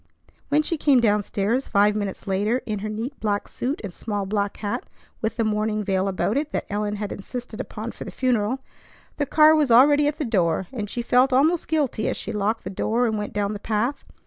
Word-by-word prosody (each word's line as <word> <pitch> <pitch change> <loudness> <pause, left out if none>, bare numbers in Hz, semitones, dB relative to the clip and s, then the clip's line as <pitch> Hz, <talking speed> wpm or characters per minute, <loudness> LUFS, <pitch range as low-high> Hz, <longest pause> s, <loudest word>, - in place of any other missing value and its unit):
When 300 +2 +3
she 330 +2 -1
came 280 -4 +5
down 210 -3 +3
stairs 210 +6 -1
five 205 0 +3
minutes 200 -2 -3
later 205 +6 0
in 210 -2 -3
her 215 +2 -4
neat 230 +6 -5
black 205 -2 -1
suit 270 +6 -3
and 195 -4 -6
small 205 -1 -3
black 200 0 -1
hat 205 -1 -3 0.4
with 220 +1 -2
the 230 - +2
mourning 215 0 0
veil 190 -1 0
about 195 +5 0
it 300 +1 -1
that - - -1
Ellen 210 0 -1
had 205 0 -4
insisted 240 +2 -6
upon 220 +2 -6
for - - -9
the - - -7
funeral, 250 0 0 0.6
the 290 - 0
car 310 +2 +6
was 300 -4 +3
already 290 +5 +6
at 295 - -1
the 300 - -2
door, 185 -6 +1
and 210 -5 -4
she 240 - -3
felt 250 +3 +4
almost 310 +7 +3
guilty 285 -8 0
as - - -2
she - - -5
locked 210 +2 -1
the 185 - -5
door 230 +5 0
and 220 -2 0
went 210 -1 -3
down 205 0 -1
the 205 - -5
path. 230 +7 -1
220 Hz, 225 wpm, -24 LUFS, 205-260 Hz, 0.6 s, car